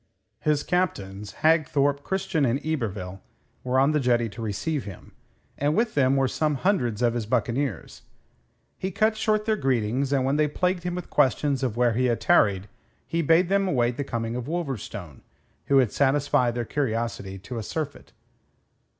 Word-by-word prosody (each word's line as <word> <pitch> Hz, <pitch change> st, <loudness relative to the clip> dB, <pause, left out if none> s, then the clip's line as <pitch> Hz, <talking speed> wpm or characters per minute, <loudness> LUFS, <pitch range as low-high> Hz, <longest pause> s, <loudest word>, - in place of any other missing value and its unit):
His 150 Hz, -1 st, +1 dB
captains, 105 Hz, -, -2 dB
Hagthorpe, 145 Hz, -3 st, +3 dB
Christian, 190 Hz, -3 st, -1 dB
and 130 Hz, +1 st, +2 dB
Yberville, 105 Hz, -11 st, -3 dB, 0.4 s
were 125 Hz, +1 st, 0 dB
on 135 Hz, +3 st, +4 dB
the 150 Hz, -, +2 dB
jetty 120 Hz, -3 st, +2 dB
to 105 Hz, +3 st, -9 dB
receive 130 Hz, -, -2 dB
him, 100 Hz, -3 st, -10 dB, 0.5 s
and 145 Hz, +2 st, +1 dB
with 225 Hz, -1 st, +1 dB
them 135 Hz, -1 st, +3 dB
were 135 Hz, -1 st, +2 dB
some 150 Hz, +3 st, 0 dB
hundreds 125 Hz, -, 0 dB
of 120 Hz, -1 st, +3 dB
his 115 Hz, -3 st, -3 dB
buccaneers. 120 Hz, -, -2 dB, 0.8 s
He 190 Hz, -, -2 dB
cut 215 Hz, +3 st, +1 dB
short 215 Hz, -1 st, 0 dB
their 220 Hz, 0 st, +2 dB
greetings, 130 Hz, -, 0 dB
and 135 Hz, -2 st, +2 dB
when 135 Hz, +2 st, +1 dB
they 150 Hz, 0 st, +3 dB
plagued 180 Hz, +4 st, 0 dB
him 175 Hz, 0 st, -3 dB
with 180 Hz, -, -7 dB
questions 140 Hz, 0 st, +2 dB
of 125 Hz, -4 st, -2 dB
where 120 Hz, -1 st, +3 dB
he 125 Hz, +3 st, +1 dB
had 120 Hz, -2 st, +1 dB
tarried, 100 Hz, -3 st, +3 dB, 0.4 s
he 170 Hz, -, -1 dB
bade 165 Hz, +3 st, +4 dB
them 195 Hz, +1 st, +2 dB
await 120 Hz, -7 st, +1 dB
the 145 Hz, -, -2 dB
coming 115 Hz, -3 st, -3 dB
of 125 Hz, -1 st, -4 dB
Wolverstone, 120 Hz, -, -5 dB, 0.4 s
who 140 Hz, -, +2 dB
would 130 Hz, -5 st, +4 dB
satisfy 135 Hz, -3 st, +2 dB
their 120 Hz, 0 st, -3 dB
curiosity 115 Hz, -7 st, -2 dB
to 115 Hz, +5 st, -6 dB
a -, -, -3 dB
surfeit. 150 Hz, +6 st, -5 dB
135 Hz, 175 wpm, -25 LUFS, 115-155 Hz, 0.8 s, on